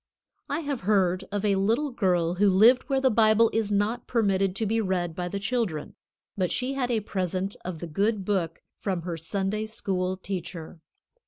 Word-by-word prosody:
I 295 +3 -1
have 285 -4 -3
heard 190 -2 +2
of 205 +1 -1
a 200 -2 +3
little 230 +9 +1
girl 180 -7 +1
who 200 +3 +3
lived 225 +9 +5
where 270 -1 +2
the 265 -1 +3
Bible 220 0 +4
is 220 -2 0
not 210 +4 0
permitted 195 -5 +1
to 220 - 0
be 225 +2 +1
read 180 -4 -1
by 180 0 -3
the 200 - -4
children. 200 -8 -2 0.4
But 185 -3 0
she 255 +2 -1
had 260 -3 -1
a 230 -3 +1
present 190 -1 -2
of 180 -2 -5
the 170 - -6
good 200 +5 0
Book 180 -5 -1 0.2
from 185 -4 -2
her 175 -1 -3
Sunday 195 +6 -2
School 185 -3 -2
teacher. 180 -3 -6
200 Hz, 185 wpm, -26 LUFS, 185-225 Hz, 0.4 s, lived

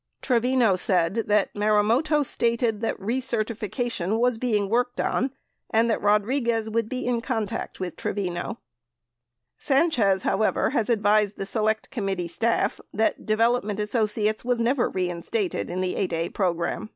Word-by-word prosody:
Tre 250 -3 +3
vino 245 -4 +3
said 185 +4 +1 0.3
Marumoto 220 +9 +2
stated 235 -3 0
that 225 - -1
recertification 225 -2 -2
was 240 -1 +1
being 215 -5 +1
worked 245 +3 0
on 260 - 0 0.4
and 230 +1 +2
that - - -1
Rodriguez 220 +2 +1
would 230 0 0
be 255 - -3
in 240 -1 0
contact 225 -5 -3
with 185 -2 -4
Trevino. 185 +2 -3 1.0
Sanchez, 250 - +2
how 200 - 0
ever, 215 - +1
has 230 -6 0
advised 210 -2 +2
the 195 - -4
Select 215 +1 -1
Committee 195 -7 -2
staff 225 +7 0
that 220 +2 -1
Development 215 -1 +1
Asso 215 +1 +1
ciates 215 0 0
was 245 -1 0
never 240 +2 +1
reinstated 185 - -2
in 180 +1 -2
the 185 -1 -1
8(a) 170 -3 -2
program. 175 +2 -1
220 Hz, 140 wpm, -25 LUFS, 200-240 Hz, 1.0 s, Tre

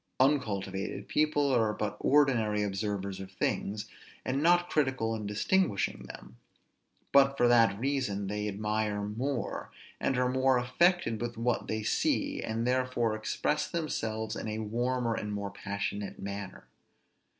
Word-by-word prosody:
Uncultivated 100 -8 0
people 150 -2 +2
are 110 -4 +2
but 105 -1 -3
ordinary 120 -8 +3
observers 100 -1 -3
of 95 0 -8
things, 105 +2 -2 0.4
and 135 +2 0
not 175 +2 +4
critical 135 -8 0
in 105 -2 -4
distinguishing 105 - 0
them; 60 - -11 0.7
but, 140 0 +5
for 120 - +4
that 115 -4 +5
reason 125 -7 -1
they 105 +1 -2
admire 105 0 -1
more, 120 +4 -3 0.3
and 135 - 0
are 125 0 +2
more 130 0 +3
affected 125 - +2
with 120 -1 -4
what 115 +1 0
they 110 0 -2
see, - - 0
and 115 +1 -2
therefore 125 -3 +1
express 110 +7 -1
themselves 110 -9 -2
in - - -5
a 110 0 -3
warmer 120 +2 -1
and 105 -1 -3
more 100 -1 -3
passionate 100 0 -4
manner. 100 0 -6
110 Hz, 140 wpm, -30 LUFS, 105-130 Hz, 0.7 s, but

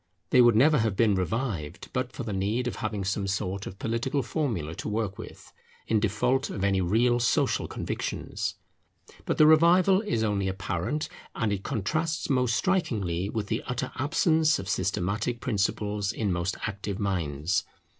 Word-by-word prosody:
They 125 - +7
would 120 -2 +6
never 145 +5 +5
have 110 -3 +1
been 110 -1 +3
revived 95 - -2
but 125 -1 -1
for 130 - -6
the 110 -3 -4
need 105 +6 0
of 125 - -3
having 105 -2 -3
some 100 +1 -1
sort 100 0 -2
of 95 - -8
political 130 +6 -1
formula 110 - -2
to - - -4
work 105 -2 -2
with, - - -11 0.3
in 110 - +2
default 125 +7 +1
of 95 - -4
any 100 -1 +2
real 120 +7 +3
social 120 - +1
convictions. - - -3 0.7
But - - -1
the 155 - +7
revival 175 +5 +6
is 200 - -1
only 100 -3 0
apparent, 95 - -2 0.3
and 110 -3 0
it 95 - -3
contrasts 155 - -1
most 125 -3 +2
strikingly 100 - 0
with 110 -1 -2
the 110 +2 -2
utter 125 0 -3
absence 155 +2 +2
of 95 - -6
systematic 100 +5 -1
principles 105 -3 -1
in 110 -3 -1
most 85 +2 -2
active 100 -2 -4
minds. 85 -5 -1
110 Hz, 165 wpm, -27 LUFS, 95-125 Hz, 0.7 s, They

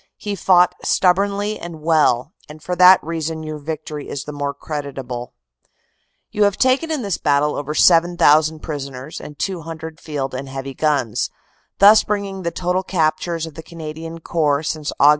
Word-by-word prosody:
He 205 - -4
fought 180 -1 +4
stubbornly 200 +3 +1
and 170 -2 -8
well, 155 -2 +2 0.2
and 150 +1 -10
for 180 - -2
that 185 +1 +8
reason 160 0 -4
your 155 -1 -6
victory 150 -1 -6
is 140 - -4
the 150 - -7
more 145 -1 -3
creditable. 135 -5 -6 1.0
"You 210 0 +2
have 200 -1 +1
taken 260 +5 +2
in 305 -6 -2
this 200 -3 -2
battle 145 +1 +2
over 145 +1 -4
7,000 160 -3 +4
prisoners 140 -1 -6
and 150 - -10
200 160 -3 -5
Field 140 -4 -4
and 135 +1 -5
Heavy 135 0 -6
guns, 135 -7 0 0.5
thus 205 +2 +7
bringing 200 -2 -3
the 170 - -1
total 180 +2 -1
captures 165 -2 -1
of 160 - -10
the 160 - -8
Canadian 165 0 -8
Corps 150 -3 0
since 155 -1 -3
Aug. 145 - +7
160 Hz, 160 wpm, -20 LUFS, 145-180 Hz, 1.0 s, that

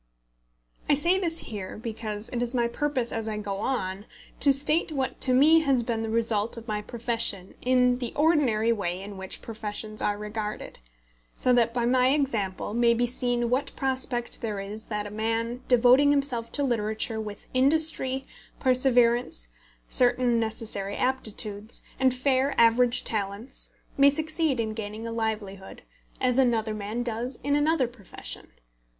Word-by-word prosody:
I 290 - +6
say 345 +6 +3
this 335 -3 -1
here, 205 - -6
because 220 -1 -4
it 240 - -3
is 245 +1 -1
my 240 -1 +2
purpose 255 -1 -1
as 225 -1 -3
I 215 -1 -3
go 200 -2 -4
on 200 -3 -3 0.3
to 280 - +5
state 295 +5 +2
what 270 -3 -3
to 260 - +3
me 295 +6 +6
has 275 -6 +2
been 230 -1 -2
the 225 - -3
result 225 0 0
of 230 0 -9
my 210 -1 -2
profession 230 -4 -2
in 250 0 +3
the 245 -2 -4
ordinary 275 -8 +3
way 180 -4 -3
in 200 +1 -8
which 190 0 -5
professions 215 -1 -5
are 205 0 0
regarded, 210 0 -5 0.6
so 250 - +3
that 235 -1 +3
by 240 0 -1
my 250 +1 +3
example 210 -9 -2
may 235 0 +3
be 240 +1 +1
seen 245 -1 0
what 275 +3 -1
prospect 260 -2 -1
there 215 -3 -3
is 210 +3 -7
that 210 -1 -3
a 205 - -7
man 225 +3 -2
devoting 250 +3 +5
himself 270 -5 0
to 285 - 0
literature 220 -2 0
with 210 -2 -8
industry, 270 -1 +1 0.3
perseverance, 245 - +2 0.4
certain 245 -1 +3
necessary 220 -3 -3
aptitudes, 215 -4 -2 0.2
and 260 -1 +4
fair 265 +1 +1
average 235 +1 +4
talents, 205 +3 -1 0.3
may 280 0 +8
succeed 310 -2 0
in 220 -1 -1
gaining 215 0 -6
a 230 - -4
livelihood, 210 -4 -4 0.4
as 255 0 +2
another 230 -4 +2
man 215 +3 -3
does 240 +2 -3
in 285 +1 +1
another 295 -2 +2
profession. 235 -5 -8
235 Hz, 155 wpm, -27 LUFS, 215-260 Hz, 0.6 s, may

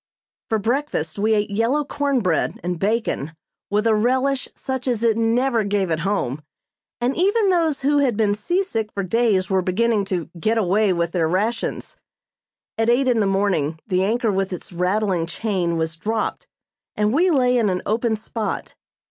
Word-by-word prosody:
For 220 - +2
breakfast 220 - -2
we 215 +2 +3
ate 205 -1 0
yellow 230 +8 +1
corn 280 -2 0
bread 180 -5 0
and 175 -1 -2
bacon 200 -7 -1 0.4
with 210 +2 +1
a 225 - +4
relish 260 +5 +1
such 260 -1 -4
as 235 -3 0
it 230 -2 +3
never 230 +1 +1
gave 200 -3 0
at 160 - 0
home, 165 -7 -1 0.6
and 245 +3 0
even 400 +3 +2
those 325 -5 +1
who 285 +2 +3
had 255 -7 +1
been 210 -2 +2
seasick 225 - -1
for 200 - -2
days 200 -1 +1
were 190 -1 +3
beginning 205 +3 +1
to 180 -4 -3
"get 220 +7 +1
away" 205 0 +2
with 170 -1 0
their 170 -3 +1
rations. 210 +7 -2 0.8
At 225 +1 +2
eight 255 +3 +3
in 240 -3 +3
the 205 - +2
morning 195 -6 0
the 185 -3 +1
anchor 225 +2 +1
with 195 0 -1
its 180 0 -7
rattling 180 -1 0
chain 175 -3 -1
was 160 0 -2
dropped 220 +6 -3 0.5
and 210 +1 +1
we 350 +6 +3
lay 250 -6 +3
in 230 -4 +2
an 180 -1 -2
open 225 +1 +1
spot. 215 0 -4
215 Hz, 175 wpm, -22 LUFS, 185-245 Hz, 0.8 s, a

